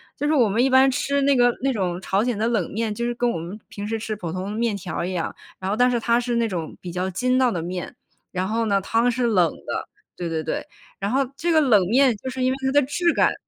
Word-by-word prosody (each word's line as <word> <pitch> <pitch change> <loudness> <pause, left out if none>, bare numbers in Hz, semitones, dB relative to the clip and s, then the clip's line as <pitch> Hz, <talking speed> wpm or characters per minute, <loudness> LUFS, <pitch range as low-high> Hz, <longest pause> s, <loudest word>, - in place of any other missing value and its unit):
就 295 - -2
是 - - +2
我 250 -7 +4
们 220 +5 +2
一 270 - +3
般 265 +1 +6
吃 280 +1 0
那 280 0 +4
个 245 -1 +5
那 270 0 +1
种 180 -4 -2
朝 195 +3 +1
鲜 240 -4 -1
的 220 - +1
冷 220 -7 0
面， 220 0 -1
就 235 - -3
是 240 0 0
跟 245 0 +1
我 165 - -2
们 180 +6 -7
平 205 0 -7
时 225 - -1
吃 215 -1 -4
普 175 -5 -5
通 185 +3 -4
面 225 -2 0
条 175 - -4
一 180 - -2
样， 175 -3 -3 0.2
然 190 - -3
后 205 - +1
但 245 +2 +4
是 240 - +1
它 235 +1 +2
是 245 -1 -2
那 235 -1 +2
种 170 -6 -5
比 175 - -7
较 180 +2 -2
筋 255 +7 +1
道 255 -2 +3
的 170 - -2
面， 180 +2 -5 0.4
然 185 0 -2
后 225 +2 0
呢， 200 -1 +3
汤 230 +5 +1
是 245 +1 0
冷 185 -7 +3
的， - - -4 0.3
对 175 -2 -4
对 160 -1 -2
对。 - - -3 0.3
然 200 +1 -2
后 270 +2 +2
这 340 +3 -1
个 315 - +5
冷 235 -9 +5
面 255 0 +4
就 260 - -6
是 260 0 -5
因 255 - +3
为 265 - -2
它 265 - +1
的 290 +1 +5
质 340 +6 +1
感 - - +3
230 Hz, 305 characters per minute, -23 LUFS, 190-255 Hz, 0.4 s, 般